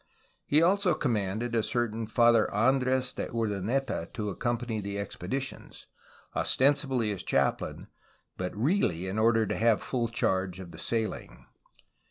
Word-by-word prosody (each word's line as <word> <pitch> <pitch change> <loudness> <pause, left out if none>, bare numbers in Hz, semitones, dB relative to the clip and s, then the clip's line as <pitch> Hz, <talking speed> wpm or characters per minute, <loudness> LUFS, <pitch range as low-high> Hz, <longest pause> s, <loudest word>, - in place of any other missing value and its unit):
He 150 +3 +4
also 185 -1 +3
commanded 115 -4 -1
a 115 - +3
certain 110 0 -1
Father 115 -1 +4
Andres 130 +3 +2
de - - -4
Urdaneta 110 -2 -2
to 105 -3 -2
accompany 120 +1 -2
the 100 0 -4
expeditions, 100 +6 -5 0.5
ostensibly 135 -5 +2
as 100 - -3
chap 70 0 +1
lain, - - -7 0.5
but 90 +1 -4
really 110 - +1
in 95 +3 -2
order 115 0 +4
to - - -2
have 115 -1 +2
full 120 -3 -1
charge 95 -4 -1
of 90 -2 -9
the - - -11
sailing. 115 -2 -3
115 Hz, 140 wpm, -29 LUFS, 100-130 Hz, 0.5 s, He